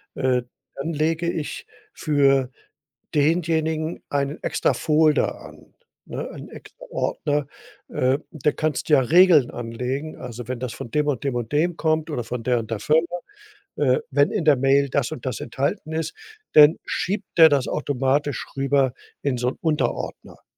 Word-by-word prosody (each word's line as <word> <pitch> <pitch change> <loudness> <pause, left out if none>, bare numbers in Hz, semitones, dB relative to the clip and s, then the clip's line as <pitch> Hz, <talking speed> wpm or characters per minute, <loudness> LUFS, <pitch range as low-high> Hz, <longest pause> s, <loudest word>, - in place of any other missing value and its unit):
äh, 125 -2 +1 0.3
dann 160 +4 -4
lege 165 +3 0
ich 155 -3 -5 0.3
für 135 -3 +2 0.7
denjenigen 160 +1 0
einen 140 +1 -2
extra - - +1
Folder 155 -1 +2
an, - - -14 0.3
ne, - - -5
einen - - -10
extra - - -13
Ordner. 145 - -1 0.4
Äh. 130 +3 +1
Der 150 -1 0
kannst 155 -3 -2
ja 150 -3 +6
Regeln 155 0 +5
anlegen, 125 +6 -4
also, 120 -1 -8
wenn 125 -2 -3
das 125 -3 -4
von 115 - -8
dem 150 0 +1
und 135 -4 -1
dem 135 -3 -1
und 120 0 -3
dem 170 +3 +1
kommt 155 0 0
oder 125 -6 -2
von 120 0 -5
der 120 0 +2
und 110 0 -7
der 110 - -2
Firma, 160 +3 +2 0.7
äh, 130 -3 +3
wenn 145 +2 +3
in 195 -7 -1
der 150 - +6
Mail 135 +2 +3
das 140 +1 0
und 155 - -7
das 130 - -3
enthalten 140 +5 -3
ist, 160 0 -2 0.4
dann 150 +1 +8
schiebt 200 +1 -2
der 160 -1 +9
das 140 -3 +1
automatisch 140 0 -1
rüber 135 -1 +2 0.3
in 135 -3 -1
so 125 +1 0
'n - - -8
Unterordner. 155 -2 -2
145 Hz, 165 wpm, -23 LUFS, 130-155 Hz, 0.7 s, der